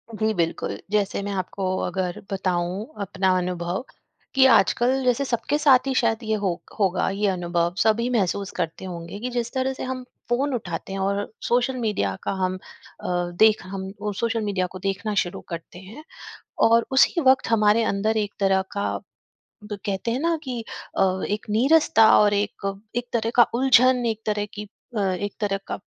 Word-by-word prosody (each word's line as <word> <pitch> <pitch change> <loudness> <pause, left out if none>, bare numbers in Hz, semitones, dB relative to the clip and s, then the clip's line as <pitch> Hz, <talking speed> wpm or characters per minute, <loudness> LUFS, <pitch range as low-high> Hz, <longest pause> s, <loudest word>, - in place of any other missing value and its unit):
जी 220 +1 0
बिल्कुल, 170 -3 -2
जैसे 205 -2 0
मैं 200 - -3
आपको 190 +1 -3 0.2
अगर 185 +2 -3
बताऊँ 185 +1 -1 0.2
अपना 190 -1 0
अनुभव, 180 +2 -2 0.5
कि 265 0 +6
आजकल 255 +3 +4
जैसे 250 +2 +2
सबके 255 +3 0
साथ 275 -3 +4
ही 270 - +1
शायद 225 -3 +2
ये 220 0 0
हो 190 -4 -2 0.2
होगा 190 -3 +2
ये 205 +2 0
अनुभव, 175 -2 0
सभी 225 +3 +2
महसूस 200 -4 0
करते 170 +1 -3
होंगे 175 +1 -7
कि 250 +3 -3
जिस 240 -1 -2
तरह 260 0 0
से - - -7
हम 255 0 -4 0.3
फ़ोन 265 +3 +1
उठाते 195 -4 -4
हैं 195 - -3
और 200 +2 -1 0.2
सोशल 250 +2 +1
मीडिया 210 - -1
का - - -1
हम 185 0 0 0.5
अ, - - -4 0.3
देख 220 0 +5
हम 190 0 -6
ओ 210 0 -2
सोशल 225 +2 -1
मीडिया 200 -3 -1
को 185 - -8
देखना 195 +3 -2
शुरू 175 - -7
करते 170 +1 -7
हैं 210 +11 -11 0.7
और 230 +1 +4
उसी 275 +6 +4
वक़्त 265 -2 +4
हमारे 215 0 +4
अंदर 215 +2 0
एक 210 -1 -1
तरह 195 -1 +3
का, 200 - -1 0.7
ब 210 -1 -6
कहते 200 +3 -2
हैं 245 +4 -1
न 335 0 +2
कि 250 -3 -4 0.4
अ, 190 0 +2
एक 210 +1 -3
नीरसता 235 -1 +5
और 205 -1 +4
एक 200 -1 -2 0.2
एक 245 0 -2
तरह 230 -1 0
का 240 -2 +7
उलझन, 255 0 +4
एक 220 -1 -2
तरह 210 -1 0
की 210 0 -7 0.3
अ, - - +1
एक 195 +1 -1
तरह 200 -2 0
का - - -3
210 Hz, 180 wpm, -24 LUFS, 190-240 Hz, 0.7 s, का